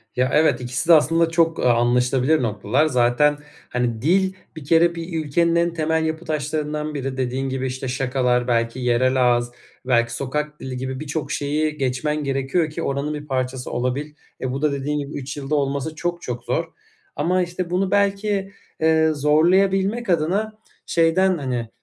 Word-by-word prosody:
Ya, 125 +1 +1
evet. 145 -5 +3
2'si 125 +6 -3
de, 170 - +9
aslında, 165 +2 +4
çok, 165 0 +1
aaa, 125 -1 +4
anlaşılabilir 125 +5 +2
noktalar. 110 +7 +1
Zaten, 135 +2 +3 0.3
hani, 120 -2 -1
dil, 190 +6 +2 0.2
bir 155 - -9
kere, 170 +3 +4
bir 165 -1 -4
ülkenin 170 +4 +2
en 170 0 +2
temel 160 0 0
yapı 160 +2 -3
taşlarından 150 0 -2
biri 135 -2 -4
dediğin 130 +1 -2
gibi, 130 0 -2
işte, 130 +1 -5
şakalar 125 -1 0
belki 115 +1 0
yerel 125 +1 +2
ağız, 120 0 +2 0.3
belki 120 -2 +2
sokak 150 +4 -3
dili 130 -1 -6
gibi 130 +1 -4
birçok 150 -1 -4
şeyi 150 +2 -1
geçmen 145 +3 -1
gerekiyor 135 +4 0
ki 165 +2 -5
oranın 140 +2 -2
bir 150 0 -7
parçası 130 -1 -3
olabil. 130 +5 -2 0.3
E, 130 - -2
bu 135 +2 -4
da, 150 - +2
dediğin 145 +2 -2
gibi, 140 +1 -6
3 140 +1 -6
yılda 145 +2 -2
olması 140 +2 -1
çok, 175 +1 -3
çok - - -5
zor - - -1 0.5
ama, 185 +2 +1
işte, 175 0 -3
bunu 185 +2 0
belki, 200 0 +1 0.3
eee, 160 0 +4
zorlayabilmek 190 +9 +2
adına 185 +7 +1 0.3
şeyden, 175 +2 +2
hani, 125 -5 -3
150 Hz, 170 wpm, -22 LUFS, 130-165 Hz, 0.5 s, de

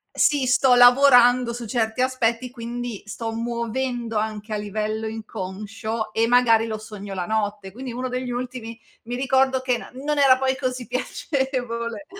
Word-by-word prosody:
sì, 290 -3 +3
sto 255 0 +4
lavorando 245 -1 +6
su 240 0 -6
certi 225 +1 -1
aspetti 250 -1 0
quindi 240 -2 -6
sto 225 +2 -5
muovendo 235 0 -3
anche 215 0 -3
a - - 0
livello 215 +1 -3
inconscio 220 +1 -5
e 225 +1 +2
magari 230 -2 +4
lo 220 -1 -3
sogno 210 -2 -8
la 180 -2 -2
notte. 205 -1 -2
Quindi 255 +4 -7
uno 255 +2 -3
degli 250 0 -3
ultimi 245 -2 -5 0.2
mi 240 +2 -5
ricordo 265 0 +2
che 255 -2 0
n - - -11 0.2
non 300 -1 0
era 265 -2 +6
poi 265 0 0
così 255 -2 -3
piacevole. 250 -1 -3
235 Hz, 155 wpm, -23 LUFS, 220-255 Hz, 0.2 s, lavorando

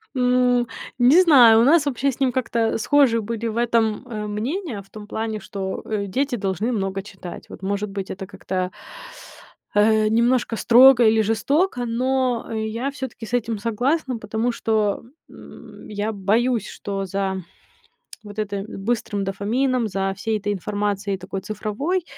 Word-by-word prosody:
М, 250 -1 +2 0.3
не 275 +9 +7
знаю, 245 -10 +7
у - - +5
нас 300 +2 +5
вообще 275 0 0
с 255 - -11
ним 265 -2 +2
как-то 235 -3 0
схожи 240 -2 +3
были 230 +1 -3
в 225 +1 -4
этом, 230 0 +1
э, 215 -3 -5
мнения, 235 - -3
в 195 - -20
том 210 -1 -10
плане, 220 -1 -3
что, 190 -1 -5
э, 210 -2 -2
дети 265 +5 -1
должны 200 +3 -1
много 195 -3 -2
читать. 190 -3 -10
Вот, - - -11
может 200 +2 -2
быть, 195 -1 -5
это 190 +1 -6
как-то 185 -2 -3 1.0
э, 215 +1 +4
немножко 235 +1 +2
строго 245 +2 +7
или 220 0 +4
жестоко, 245 - +1
но 250 +1 0
я 220 +5 -2
всё-таки 265 -5 -7
с 225 - -11
этим 230 -2 0
согласна, 250 +4 -1
потому 220 +3 -2
что, 215 -3 0 0.3
м, - - -13
я 210 +1 -2
боюсь, 220 +3 +1
что 195 -1 -5
за 190 0 -2 0.8
вот 205 0 -9
это 200 -2 -2
быстрым 210 -1 -2
дофамином, 230 +5 0
за 195 -1 -2
всей 215 +1 -1
этой 205 +1 -2
информацией 205 0 -2
такой 190 +1 -6
цифровой, 215 - -2
220 Hz, 155 wpm, -22 LUFS, 205-245 Hz, 1.0 s, не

